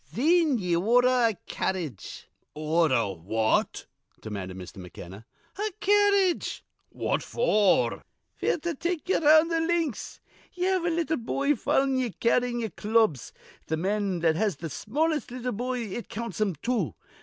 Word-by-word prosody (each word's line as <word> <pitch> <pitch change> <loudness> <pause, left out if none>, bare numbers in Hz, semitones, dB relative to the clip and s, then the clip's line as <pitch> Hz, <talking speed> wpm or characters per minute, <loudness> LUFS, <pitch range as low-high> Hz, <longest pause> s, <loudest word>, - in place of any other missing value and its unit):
Thin 315 +1 +2
ye 180 -5 0
ordher 245 +5 +4
a 220 - -4
carredge" 160 - -4 0.3
"Order 155 -7 +2
what?" 110 +6 0 0.3
demanded 95 -3 -6
Mr. 90 0 -10
McKenna. 95 +3 -10 0.3
"A 425 +1 -1
carredge." 405 -3 +2 0.3
"What - - -1
for?" 215 - +2 0.4
"F'r - - +1
to 345 -1 -1
take 340 +3 -3
ye - - +4
'round 315 +2 +5
th' 330 -1 +1
links. 325 -7 -2 0.3
Ye 360 - -4
have 375 -2 +1
a - - +2
little 325 -1 0
boy 280 +5 0
followin' 270 +2 +1
ye, 250 -2 0
carryin' 240 +3 0
ye'er 220 -3 -3
clubs. 215 - +1 0.4
Th' 160 - -1
man 195 0 -1
that 160 -1 +3
has 205 0 0
th' 160 +2 -7
smallest 300 - -1
little 250 0 -4
boy 250 +3 -3
it 225 +1 -6
counts 230 0 -5
him 200 -5 +1
two. 220 - -1
235 Hz, 150 wpm, -27 LUFS, -, 0.4 s, round